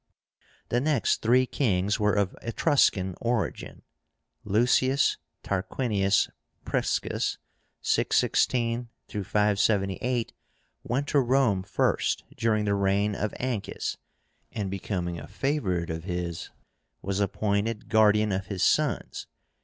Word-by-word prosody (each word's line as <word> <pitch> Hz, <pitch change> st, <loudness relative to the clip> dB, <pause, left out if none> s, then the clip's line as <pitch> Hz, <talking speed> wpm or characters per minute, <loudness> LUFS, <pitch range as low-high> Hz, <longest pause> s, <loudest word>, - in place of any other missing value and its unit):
The 120 Hz, -, +1 dB
next 145 Hz, -4 st, +1 dB
three 125 Hz, +3 st, +4 dB
kings 105 Hz, -6 st, 0 dB
were 105 Hz, -1 st, +2 dB
of 100 Hz, -2 st, 0 dB
Etruscan 115 Hz, -, +2 dB
origin. 120 Hz, -2 st, -2 dB, 0.6 s
LUCIUS 125 Hz, +6 st, +3 dB, 0.3 s
TARQUINIUS 100 Hz, 0 st, +1 dB, 0.4 s
PRISCUS -, -, -1 dB, 0.5 s
(616 120 Hz, -1 st, +1 dB, 0.2 s
578) 105 Hz, +3 st, 0 dB, 0.5 s
went 135 Hz, +5 st, -1 dB
to 145 Hz, -, +3 dB
Rome 125 Hz, -6 st, +2 dB
first 95 Hz, 0 st, 0 dB
during 110 Hz, -2 st, +1 dB
the 100 Hz, -, +1 dB
reign 100 Hz, +1 st, +1 dB
of 105 Hz, +1 st, -2 dB
Ancus, 120 Hz, -5 st, -3 dB, 0.5 s
and, 100 Hz, -3 st, -3 dB
becoming 90 Hz, -3 st, -3 dB
a -, -, -9 dB
favorite 95 Hz, -, -1 dB
of 80 Hz, +1 st, -5 dB
his, 90 Hz, -2 st, -4 dB, 0.5 s
was 100 Hz, 0 st, -2 dB
appointed 105 Hz, +2 st, -1 dB
guardian 105 Hz, -1 st, +4 dB
of 95 Hz, 0 st, -2 dB
his 95 Hz, -3 st, -2 dB
sons. -, -, +1 dB
105 Hz, 105 wpm, -27 LUFS, 95-120 Hz, 0.6 s, three